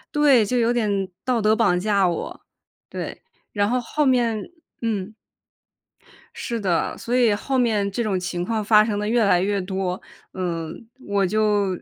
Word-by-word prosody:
对， 275 -7 +5
就 250 +4 -1
有 235 0 +2
点 200 -5 0 0.2
道 250 -3 +1
德 215 +1 +4
绑 200 -6 +2
架 200 -1 +2
我。 170 - -4 0.5
对， - - -6 0.3
然 205 -1 0
后 250 +1 +1
后 300 +5 -1
面， 235 -4 +2 0.4
嗯 215 -3 -2 1.2
是 235 -1 -3
的， 180 -5 -1
所 240 +2 -3
以 235 -4 +4
后 265 +6 -2
面 215 -5 +1
这 235 +4 -2
种 195 -4 0
情 180 -1 -3
况 220 +2 -1
发 210 0 +6
生 210 -2 -2
的 210 - -2
越 235 0 +2
来 180 -3 +4
越 200 +1 0
多， 190 -1 -3 0.3
嗯， 170 +2 -4 0.2
我 200 -1 +1
就， 210 0 +1
210 Hz, 180 characters per minute, -23 LUFS, 190-230 Hz, 1.2 s, 发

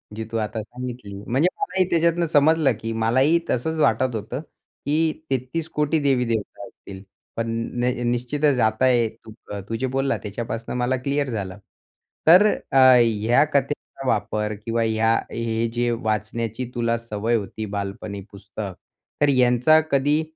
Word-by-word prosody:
जी 110 - -4
तू 115 - -1
आता 110 0 -2
सांगितली. 120 -2 -8
म्हणजे 135 +8 +2
मलाही 190 - +1
त्याच्यातनं 170 0 +2
समजलं, 155 -1 +4
की 115 - -3
मलाही 130 +9 +3
तसंच 160 +6 -1
वाटत 125 -2 +2
होतं 110 +4 -4
की 155 0 -3 0.2
33 135 +5 -2
कोटी 150 +1 +2
देवीदेवता 125 -6 -1
असतील, 95 -4 -12 0.3
पण 115 0 -2 0.3
न 125 +1 +2 0.2
निश्चितच 130 +3 0
आता 110 +3 +2
एक 115 -3 +1
तू 110 - -10 0.4
तू 115 - -2
जे 130 - 0
बोलला 135 +1 0
त्याच्यापासून 115 +3 -5
मला 125 +1 +1
क्लिअर 140 0 0
झालं. 100 -4 -4 0.7
तर 180 +6 +8 0.3
अ, - - +2 0.2
ह्या 115 +3 +3
कथेचा 140 -1 -2
वापर 105 -1 0
किंवा 115 0 0
ह्या 110 0 +2 0.2
हे 115 0 -1
जे 120 0 0
वाचण्याची 110 +1 -2
तुला 115 -1 +1
सवय 115 0 -2
होती 110 0 -4
बालपणी 100 0 -5
पुस्तक 100 0 -7 0.5
तर 145 - +5
यांचा 125 +3 +4
कधी 145 +3 +2
120 Hz, 145 wpm, -23 LUFS, 110-140 Hz, 0.7 s, तर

